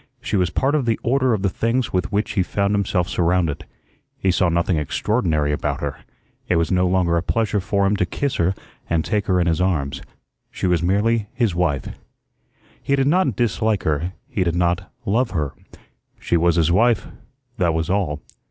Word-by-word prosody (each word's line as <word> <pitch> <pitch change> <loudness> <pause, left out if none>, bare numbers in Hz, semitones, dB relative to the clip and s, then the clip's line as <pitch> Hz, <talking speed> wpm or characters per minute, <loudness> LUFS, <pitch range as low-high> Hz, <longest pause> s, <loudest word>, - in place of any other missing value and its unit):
She 125 -3 -3
was 90 -3 +2
part 135 +9 0
of 145 -5 +1
the 115 - +1
order 130 +1 +2
of 105 -4 0
the - - +3
things 115 +6 -1
with 90 -5 -1
which 105 +2 0
he 100 - +1
found 100 +2 0
himself 100 -3 0
surrounded. 85 -4 0 0.5
He 95 - +1
saw 90 0 +2
nothing 85 0 +1
extraordinary 75 - 0
about 75 - -2
her; - - -4 0.5
it 90 - +3
was 85 -1 +1
no 90 0 +3
longer 90 -2 +2
a - - +1
pleasure 105 +3 0
for 100 +1 0
him 100 +2 +2
to 90 - +1
kiss 140 +5 -2
her 90 +3 +1 0.3
and 80 -1 +1
take 105 -2 -1
her 90 -1 +2
in 85 - +2
his 85 0 +1
arms; 70 -7 -1 0.5
she - - -4
was 90 -3 +2
merely 105 +4 +1
his 115 -7 +1
wife. 85 -6 0 0.9
He 140 - +1
did 135 -1 +1
not 150 - +2
dislike 110 -3 0
her; 80 +4 -1
he 95 - -1
did 85 -1 -1
not 90 +1 0
love 115 +5 +1
her. 75 -3 -2 0.7
She - - 0
was 85 0 +3
his 85 -1 +3
wife, 115 +4 +3 0.5
that 85 -5 +1
was 80 0 -1
all. 90 -7 -1
95 Hz, 195 wpm, -21 LUFS, 85-110 Hz, 0.9 s, the